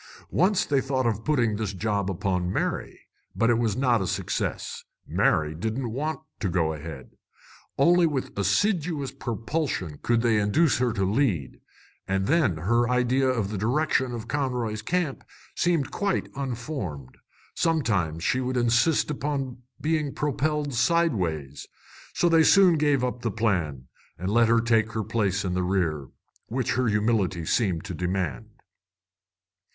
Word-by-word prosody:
Once 190 Hz, +2 st, +2 dB
they 140 Hz, -2 st, +2 dB
thought 130 Hz, -1 st, -1 dB
of 110 Hz, -2 st, 0 dB
putting 120 Hz, -8 st, +1 dB
this 105 Hz, -2 st, -3 dB
job 100 Hz, 0 st, -1 dB
upon 90 Hz, -1 st, -1 dB
Mary. -, -, -3 dB, 0.3 s
But 115 Hz, +5 st, +3 dB
it 115 Hz, -, +2 dB
was 115 Hz, -2 st, 0 dB
not 125 Hz, -5 st, +2 dB
a 95 Hz, -, -1 dB
success. 95 Hz, -1 st, -3 dB, 0.2 s
Mary 75 Hz, 0 st, +1 dB
didn't 110 Hz, +8 st, -3 dB
want 150 Hz, +5 st, -3 dB, 0.2 s
to 100 Hz, -, -1 dB
go 80 Hz, -3 st, +1 dB
ahead. 75 Hz, -3 st, -8 dB, 0.7 s
Only 170 Hz, +4 st, +5 dB
with 140 Hz, -4 st, -3 dB
assiduous 150 Hz, -, 0 dB
propulsion 115 Hz, -, -3 dB
could 120 Hz, -1 st, +2 dB
they 115 Hz, -3 st, +3 dB
induce 120 Hz, +9 st, +2 dB
her 125 Hz, -1 st, +2 dB
to 95 Hz, -4 st, 0 dB
lead; 100 Hz, -, 0 dB, 0.5 s
and 95 Hz, 0 st, 0 dB
then 140 Hz, -, +2 dB
her 120 Hz, +9 st, +1 dB
idea 125 Hz, +2 st, +2 dB
of 115 Hz, -6 st, 0 dB
the 105 Hz, -, -3 dB
direction 130 Hz, +3 st, +1 dB
of 115 Hz, -1 st, -6 dB
Conroy's 125 Hz, -6 st, -2 dB
Camp 170 Hz, +2 st, -1 dB, 0.3 s
seemed 170 Hz, -6 st, +1 dB
quite 200 Hz, -2 st, -1 dB
unformed. 120 Hz, -, -5 dB, 0.4 s
Sometimes 100 Hz, -, 0 dB
she 130 Hz, -, +1 dB
would 130 Hz, 0 st, -2 dB
insist 120 Hz, +7 st, +2 dB
upon 135 Hz, -3 st, -3 dB, 0.2 s
being 155 Hz, -2 st, -1 dB
propelled 150 Hz, 0 st, -1 dB
sideways. 100 Hz, -, 0 dB, 0.5 s
So 175 Hz, -, +3 dB
they 165 Hz, -1 st, +5 dB
soon 185 Hz, +1 st, +6 dB
gave 145 Hz, -4 st, +2 dB
up 125 Hz, -1 st, -2 dB
the 115 Hz, -, -1 dB
plan, 90 Hz, -, -1 dB, 0.3 s
and 95 Hz, +4 st, -3 dB
let 115 Hz, +1 st, +4 dB
her 115 Hz, 0 st, +4 dB
take 115 Hz, -1 st, +2 dB
her 110 Hz, 0 st, -1 dB
place 100 Hz, -3 st, 0 dB
in 90 Hz, -, -1 dB
the 90 Hz, -, 0 dB
rear, 85 Hz, -7 st, 0 dB, 0.4 s
which 125 Hz, +2 st, -1 dB
her 125 Hz, +1 st, +1 dB
humility 105 Hz, -5 st, +1 dB
seemed 95 Hz, -5 st, 0 dB
to 100 Hz, -, -5 dB
demand. 90 Hz, -2 st, -2 dB
115 Hz, 150 wpm, -26 LUFS, 95-140 Hz, 0.7 s, soon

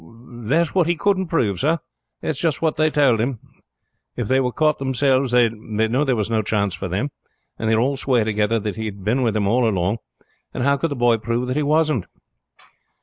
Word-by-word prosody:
"That's 135 Hz, +8 st, 0 dB
what 180 Hz, -4 st, +2 dB
he 175 Hz, -, +2 dB
couldn't 190 Hz, +2 st, 0 dB
prove, 110 Hz, -, 0 dB
sir. 160 Hz, -, +2 dB, 0.5 s
That's 150 Hz, -3 st, -2 dB
just 160 Hz, -4 st, 0 dB
what 160 Hz, -1 st, 0 dB
they 155 Hz, 0 st, +2 dB
tould 135 Hz, -7 st, +3 dB
him: 125 Hz, +1 st, -1 dB, 0.8 s
if 120 Hz, -4 st, -3 dB
they 130 Hz, +3 st, +3 dB
were 125 Hz, -1 st, 0 dB
caught 155 Hz, +2 st, +1 dB
themselves 130 Hz, -1 st, +1 dB
they 120 Hz, -1 st, +4 dB
knew 110 Hz, +4 st, -1 dB
there 135 Hz, -4 st, +1 dB
was 105 Hz, -2 st, -1 dB
no 110 Hz, -1 st, +1 dB
chance 100 Hz, -2 st, -1 dB
for 95 Hz, 0 st, -5 dB
them, 100 Hz, +11 st, -2 dB, 0.5 s
and 110 Hz, -, -1 dB
they 110 Hz, -, +4 dB
would 110 Hz, -, +2 dB
all 135 Hz, +1 st, 0 dB
swear 125 Hz, -4 st, +1 dB
together 105 Hz, +1 st, +1 dB
that 105 Hz, +1 st, -4 dB
he 110 Hz, -, -3 dB
had 100 Hz, -2 st, -7 dB
been 115 Hz, +6 st, +1 dB
with 115 Hz, -4 st, +1 dB
them 105 Hz, -2 st, +1 dB
all 115 Hz, +3 st, +2 dB
along; 95 Hz, +2 st, -1 dB, 0.6 s
and -, -, -2 dB
how 140 Hz, +2 st, +3 dB
could 150 Hz, +4 st, -1 dB
the 140 Hz, -, -3 dB
boy 120 Hz, -2 st, +3 dB
prove 120 Hz, +3 st, -2 dB
that 130 Hz, -, -1 dB
he 150 Hz, -, +1 dB
wasn't?" 150 Hz, -, +1 dB
125 Hz, 220 wpm, -21 LUFS, 110-145 Hz, 0.8 s, they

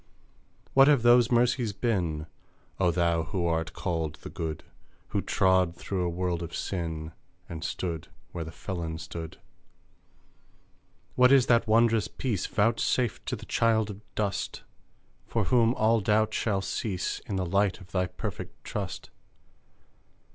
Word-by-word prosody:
What 135 Hz, +1 st, +7 dB
have 145 Hz, -5 st, +4 dB
those 120 Hz, 0 st, +6 dB
mercies 120 Hz, -2 st, +2 dB
been, 90 Hz, -9 st, -1 dB, 0.5 s
O 95 Hz, -2 st, +4 dB
thou 85 Hz, -1 st, +2 dB
who 85 Hz, +2 st, -2 dB
art 80 Hz, 0 st, 0 dB
called 80 Hz, -4 st, -2 dB
the -, -, -10 dB
Good? 80 Hz, -2 st, -4 dB, 0.5 s
Who -, -, 0 dB
trod 95 Hz, -2 st, +2 dB
through 95 Hz, 0 st, -3 dB
a 90 Hz, -, 0 dB
world 90 Hz, 0 st, -2 dB
of 85 Hz, 0 st, -6 dB
sin, 80 Hz, -4 st, -3 dB, 0.4 s
And 80 Hz, -2 st, -7 dB
stood 85 Hz, -4 st, -3 dB, 0.2 s
where 85 Hz, -, -4 dB
the 80 Hz, -, -8 dB
felon 85 Hz, -3 st, -5 dB
stood 80 Hz, 0 st, -7 dB, 1.8 s
What 125 Hz, +1 st, +5 dB
is 135 Hz, -3 st, +6 dB
that 120 Hz, -2 st, +3 dB
wondrous 115 Hz, 0 st, +4 dB
peace 110 Hz, -8 st, -2 dB
Vouchsafed 115 Hz, +1 st, +1 dB
to -, -, -1 dB
the -, -, -10 dB
child 110 Hz, -2 st, +2 dB
of 100 Hz, +1 st, -10 dB
dust 100 Hz, -2 st, -2 dB, 0.6 s
For 115 Hz, -, 0 dB
whom 120 Hz, +3 st, +3 dB
all 110 Hz, +1 st, +3 dB
doubt 105 Hz, +2 st, +2 dB
shall 100 Hz, -4 st, 0 dB
cease 95 Hz, -4 st, -2 dB
In 100 Hz, -, -3 dB
the 95 Hz, -1 st, 0 dB
light 100 Hz, +2 st, +1 dB
of 90 Hz, -2 st, -15 dB
thy 90 Hz, -1 st, +1 dB
perfect -, -, -7 dB
trust? -, -, -5 dB
95 Hz, 145 wpm, -28 LUFS, 85-115 Hz, 1.8 s, What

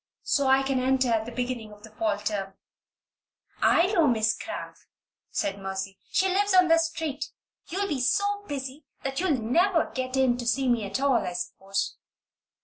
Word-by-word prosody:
so 280 Hz, -2 st, +2 dB
I 265 Hz, 0 st, +5 dB
can 270 Hz, -1 st, 0 dB
enter 260 Hz, 0 st, +2 dB
at 220 Hz, -1 st, +1 dB
the -, -, -5 dB
beginning 245 Hz, -3 st, -3 dB
of 210 Hz, 0 st, -15 dB
the 220 Hz, -, -12 dB
fall 215 Hz, -1 st, 0 dB
term. 205 Hz, -2 st, -3 dB, 1.1 s
"I 340 Hz, -, +5 dB
know 335 Hz, -6 st, +4 dB
Miss 220 Hz, -3 st, +2 dB
Cramp," -, -, -6 dB, 0.5 s
said 195 Hz, 0 st, -2 dB
Mercy. 195 Hz, 0 st, -5 dB
"She 380 Hz, -, +2 dB
lives 390 Hz, +1 st, +2 dB
on 365 Hz, -2 st, +6 dB
this 330 Hz, 0 st, +5 dB
street. 320 Hz, -3 st, -4 dB, 0.4 s
You'll 395 Hz, +3 st, -2 dB
be 290 Hz, -8 st, -2 dB
so 405 Hz, +10 st, +1 dB
busy 275 Hz, +1 st, -5 dB, 0.2 s
then 270 Hz, -, -1 dB
that 270 Hz, -, -4 dB
you'll 345 Hz, -6 st, +2 dB
never 335 Hz, -, +2 dB
get 255 Hz, 0 st, -2 dB
in 255 Hz, -2 st, +3 dB
to 240 Hz, -, -4 dB
see 260 Hz, +3 st, +1 dB
me 235 Hz, -4 st, +2 dB
at 200 Hz, +5 st, -3 dB
all, 270 Hz, -3 st, +3 dB
I 180 Hz, -, -3 dB
suppose." 195 Hz, +2 st, -3 dB
260 Hz, 185 wpm, -27 LUFS, 220-315 Hz, 1.1 s, on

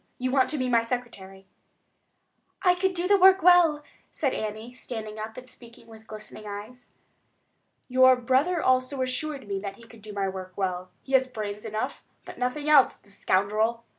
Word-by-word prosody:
You 255 Hz, 0 st, -2 dB
want 260 Hz, -1 st, +3 dB
to 305 Hz, -, -1 dB
be 255 Hz, -2 st, -1 dB
my 235 Hz, -2 st, +3 dB
secretary?" 230 Hz, -6 st, -6 dB, 1.2 s
"I 360 Hz, -2 st, +5 dB
could 370 Hz, +1 st, -1 dB
do 350 Hz, +1 st, -1 dB
the 400 Hz, 0 st, +4 dB
work 380 Hz, -1 st, +6 dB
well," 340 Hz, -4 st, +5 dB, 0.3 s
said 275 Hz, -4 st, -1 dB
Annie, 220 Hz, +3 st, -5 dB
standing 220 Hz, -4 st, -7 dB
up 220 Hz, +1 st, -7 dB
and 255 Hz, 0 st, -10 dB
speaking 235 Hz, -2 st, -16 dB
with 220 Hz, -1 st, -15 dB
glistening 215 Hz, 0 st, -10 dB
eyes. 215 Hz, +5 st, -9 dB, 1.0 s
"Your 260 Hz, 0 st, +6 dB
brother 265 Hz, +8 st, +1 dB
also 255 Hz, +1 st, +1 dB
assured 265 Hz, 0 st, -4 dB
me 200 Hz, -1 st, -2 dB
that 195 Hz, 0 st, -6 dB
he 235 Hz, -, -17 dB
could 230 Hz, -1 st, -16 dB
do 215 Hz, 0 st, -9 dB
my 200 Hz, -1 st, -2 dB
work 185 Hz, -1 st, -7 dB
well. 185 Hz, -2 st, -3 dB
He 270 Hz, -, -9 dB
had 260 Hz, -1 st, +3 dB
brains 210 Hz, -2 st, -5 dB
enough, 215 Hz, 0 st, -4 dB, 0.2 s
but -, -, -10 dB
nothing 250 Hz, +4 st, -2 dB
else, 295 Hz, -3 st, +5 dB
the 200 Hz, -, -24 dB
scoundrel!" 215 Hz, +5 st, 0 dB
245 Hz, 180 wpm, -26 LUFS, 210-265 Hz, 1.2 s, work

